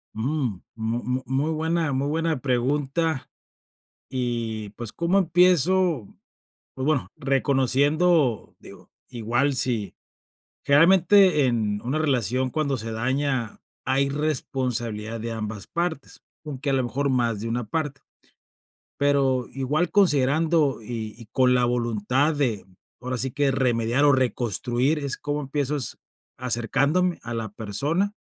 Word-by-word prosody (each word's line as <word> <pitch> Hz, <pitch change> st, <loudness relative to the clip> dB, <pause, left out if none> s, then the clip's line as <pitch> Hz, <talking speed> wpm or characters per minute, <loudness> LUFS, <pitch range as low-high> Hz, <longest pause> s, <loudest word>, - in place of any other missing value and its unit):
Mm. 125 Hz, -, -2 dB, 0.2 s
Mu 115 Hz, +2 st, -3 dB
mu 130 Hz, +1 st, -2 dB
muy 135 Hz, +5 st, -1 dB
buena 160 Hz, -1 st, 0 dB
muy 135 Hz, +2 st, -1 dB
buena 160 Hz, -2 st, 0 dB
pregunta. 140 Hz, +4 st, -1 dB, 0.8 s
Y, 115 Hz, -4 st, -3 dB
pues, 115 Hz, -1 st, -8 dB
¿cómo 170 Hz, +3 st, +1 dB
empiezo? 180 Hz, -, +3 dB, 0.7 s
Pues, 130 Hz, -, -4 dB
bueno, 150 Hz, -2 st, 0 dB
reconociendo 140 Hz, -, +2 dB
Digo -, -, -14 dB, 0.2 s
igual 120 Hz, +5 st, 0 dB
si 115 Hz, -7 st, -1 dB, 0.7 s
Generalmente, 180 Hz, +1 st, +5 dB
en 110 Hz, -4 st, 0 dB
una 130 Hz, +6 st, -2 dB
relación, 130 Hz, -4 st, +1 dB
cuando 150 Hz, -2 st, -1 dB
se 115 Hz, 0 st, -5 dB
daña, 130 Hz, 0 st, -1 dB, 0.2 s
hay 135 Hz, +1 st, +2 dB
responsabilidad 125 Hz, -6 st, -2 dB
de 115 Hz, +1 st, -3 dB
ambas 110 Hz, -2 st, -4 dB
partes, 170 Hz, -4 st, -4 dB, 0.2 s
aunque 140 Hz, -2 st, -3 dB
a -, -, 0 dB
lo 130 Hz, -1 st, +1 dB
mejor 140 Hz, +4 st, -1 dB
más 120 Hz, -5 st, +1 dB
de 115 Hz, -, -4 dB
una 120 Hz, +2 st, -2 dB
parte. 140 Hz, +4 st, -3 dB, 1.0 s
Pero 135 Hz, -3 st, +2 dB
igual, 145 Hz, +6 st, 0 dB
considerando, 155 Hz, -, +2 dB
y 110 Hz, -1 st, -5 dB
y 115 Hz, -, -11 dB
con 130 Hz, -1 st, +3 dB
la 125 Hz, -1 st, +3 dB
voluntad 120 Hz, +4 st, +1 dB
de 120 Hz, -9 st, -1 dB, 0.3 s
ahora 125 Hz, 0 st, -4 dB
sí 130 Hz, +1 st, -1 dB
que 145 Hz, 0 st, +1 dB
remediar 120 Hz, 0 st, +1 dB
o 145 Hz, -, +6 dB
reconstruir, 125 Hz, -, 0 dB
es 140 Hz, -2 st, -3 dB
¿Cómo 145 Hz, 0 st, -3 dB
empiezas? 140 Hz, -2 st, -2 dB, 0.4 s
Acercándome 135 Hz, -, 0 dB
a 120 Hz, -, -5 dB
la 115 Hz, -1 st, -3 dB
persona. 145 Hz, -, -1 dB
130 Hz, 125 wpm, -24 LUFS, 120-150 Hz, 1.0 s, o